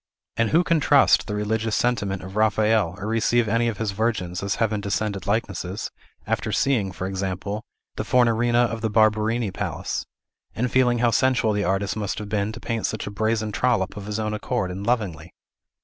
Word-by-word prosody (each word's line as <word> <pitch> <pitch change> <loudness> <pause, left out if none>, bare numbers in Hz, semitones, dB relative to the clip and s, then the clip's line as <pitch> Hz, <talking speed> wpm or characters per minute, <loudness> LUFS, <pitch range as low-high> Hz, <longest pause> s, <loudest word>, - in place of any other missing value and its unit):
And 115 -1 +1
who 170 +3 +4
can 165 -2 +2
trust 145 -3 +4
the 105 - -3
religious 110 +1 -1
sentiment 100 -6 0
of 95 +1 -9
Raphael, 110 -3 +2
or 100 - -6
receive 115 +1 +2
any 115 +3 +2
of 115 -3 -2
his 110 -3 -1
Virgins 95 -4 -1
as 100 0 -1
heaven 110 -2 0
descended 100 -1 -2
likenesses, 100 -2 -2 0.3
after - - -1
seeing, 115 -9 +1
for 95 - -5
example, 95 +2 -3 0.4
the - - -1
Fornarina 120 -1 +3
of 115 -1 -4
the 110 - 0
Barberini 110 0 +2
Palace, - - -4 0.5
and 125 +2 -1
feeling 125 -2 +3
how 120 0 +2
sensual 125 -2 +2
the 105 0 0
artist 95 +2 0
must 105 -2 -3
have 105 -2 -6
been 105 0 0
to 115 - -8
paint 115 -2 -2
such 110 - -4
a 100 - -5
brazen 110 +1 0
trollop 115 -3 0
of 100 -1 -7
his 105 0 -2
own 110 0 -2
accord, 105 -2 -2
and 95 +4 -6
lovingly? 90 -9 -1
110 Hz, 190 wpm, -24 LUFS, 100-115 Hz, 0.5 s, who